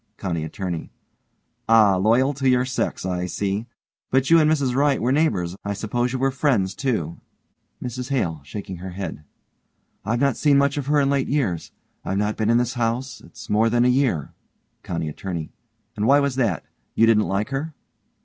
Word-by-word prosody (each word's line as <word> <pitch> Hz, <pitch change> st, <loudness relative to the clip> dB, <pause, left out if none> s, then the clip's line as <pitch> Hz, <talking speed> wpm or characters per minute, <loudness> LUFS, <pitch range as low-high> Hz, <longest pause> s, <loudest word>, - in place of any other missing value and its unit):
COUNTY 85 Hz, -5 st, -3 dB
ATTORNEY: 85 Hz, +1 st, -5 dB, 0.8 s
Ah, 110 Hz, -4 st, +6 dB
loyal 120 Hz, +8 st, +3 dB
to 135 Hz, -1 st, +1 dB
your 125 Hz, 0 st, +3 dB
sex, 130 Hz, -6 st, -2 dB
I 90 Hz, -1 st, -2 dB
see. 100 Hz, +4 st, -2 dB, 0.4 s
But 130 Hz, +3 st, +1 dB
you 165 Hz, -, +8 dB
and 155 Hz, -1 st, +4 dB
Mrs 140 Hz, -5 st, +1 dB
Wright 140 Hz, +1 st, +2 dB
were 120 Hz, +3 st, +1 dB
neighbors. 105 Hz, -, +1 dB
I 100 Hz, -, -2 dB
suppose 120 Hz, +4 st, -1 dB
you 130 Hz, -, -2 dB
were 135 Hz, +1 st, +1 dB
friends, 125 Hz, -9 st, +1 dB
too. 110 Hz, -, -2 dB, 0.6 s
MRS 125 Hz, +1 st, -5 dB
HALE: 85 Hz, -, -1 dB
(shaking 95 Hz, +6 st, -7 dB
her 90 Hz, +1 st, -7 dB
head) 90 Hz, -5 st, -6 dB, 0.8 s
I've 115 Hz, +2 st, -1 dB
not 140 Hz, -3 st, +2 dB
seen 145 Hz, -2 st, +4 dB
much 140 Hz, 0 st, +2 dB
of 140 Hz, -2 st, -3 dB
her 145 Hz, 0 st, +3 dB
of 140 Hz, -, +2 dB
late 140 Hz, -1 st, +1 dB
years. 115 Hz, -, -1 dB, 0.3 s
I've 95 Hz, -, -2 dB
not 105 Hz, +1 st, 0 dB
been 110 Hz, 0 st, 0 dB
in 115 Hz, -, +4 dB
this 125 Hz, +1 st, 0 dB
house 120 Hz, +1 st, -2 dB
it's -, -, -12 dB
more 110 Hz, +2 st, +3 dB
than 120 Hz, +1 st, +3 dB
a -, -, +4 dB
year. 125 Hz, -, +1 dB, 0.5 s
COUNTY 85 Hz, -2 st, -3 dB
ATTORNEY: 85 Hz, +1 st, -5 dB, 0.4 s
And 105 Hz, +2 st, 0 dB
why 140 Hz, +1 st, +6 dB
was 140 Hz, -2 st, 0 dB
that? 115 Hz, -9 st, 0 dB, 0.3 s
You 115 Hz, -, +5 dB
didn't 110 Hz, -2 st, +4 dB
like 100 Hz, +2 st, -1 dB
her? 145 Hz, +3 st, -4 dB
115 Hz, 190 wpm, -23 LUFS, 95-135 Hz, 0.8 s, you